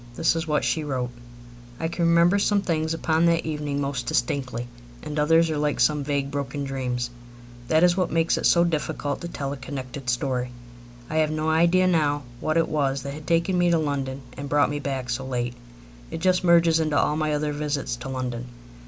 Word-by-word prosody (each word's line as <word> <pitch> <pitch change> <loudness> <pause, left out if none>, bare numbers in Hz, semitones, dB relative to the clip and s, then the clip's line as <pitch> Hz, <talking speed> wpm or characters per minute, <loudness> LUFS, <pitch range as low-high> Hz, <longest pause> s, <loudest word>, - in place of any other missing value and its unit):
This 165 0 +2
is 165 0 -2
what 150 -1 +1
she 160 - 0
wrote: 130 -4 -2 0.7
I 165 - -1
can 170 0 0
remember 170 +4 +4
some 200 0 +2
things 160 -2 0
upon 165 0 +2
that 170 0 +2
evening 150 -2 -2
most 140 -3 -2
distinctly, 125 -1 -1 0.4
and 150 0 -3
others 165 +2 +4
are 150 - -1
like 150 -1 0
some 150 -2 +3
vague, 140 -1 -1
broken 140 0 -3
dreams. 125 -3 -3 0.6
That 160 +4 +3
is 175 -1 +5
what 185 -2 0
makes 165 0 +2
it - - +1
so 170 - +5
difficult 150 -4 -2
to 170 - -4
tell 140 -4 -4
a - - -7
connected 130 0 -6
story. 125 0 -1 0.6
I 155 - -3
have 155 -1 +3
no 155 +1 0
idea 170 +3 +4
now 150 -5 +2 0.2
what 155 +1 0
it 165 - +3
was 140 -3 0
that 140 0 -5
had 150 +1 -10
taken 170 +2 +2
me 175 0 +3
to 170 - +4
London 140 -3 -2
and 140 +1 -6
brought 145 -1 +3
me 145 - -2
back 135 -3 -3
so 125 +3 -2
late. 125 -2 -2 0.6
It - - -5
just 185 +1 +2
merges 170 -2 +5
into 155 -2 +1
all 150 - +2
my 155 -1 0
other 150 0 -1
visits 145 -4 -2
to 125 +2 -7
London. 125 -2 -4
150 Hz, 205 wpm, -25 LUFS, 135-165 Hz, 0.7 s, is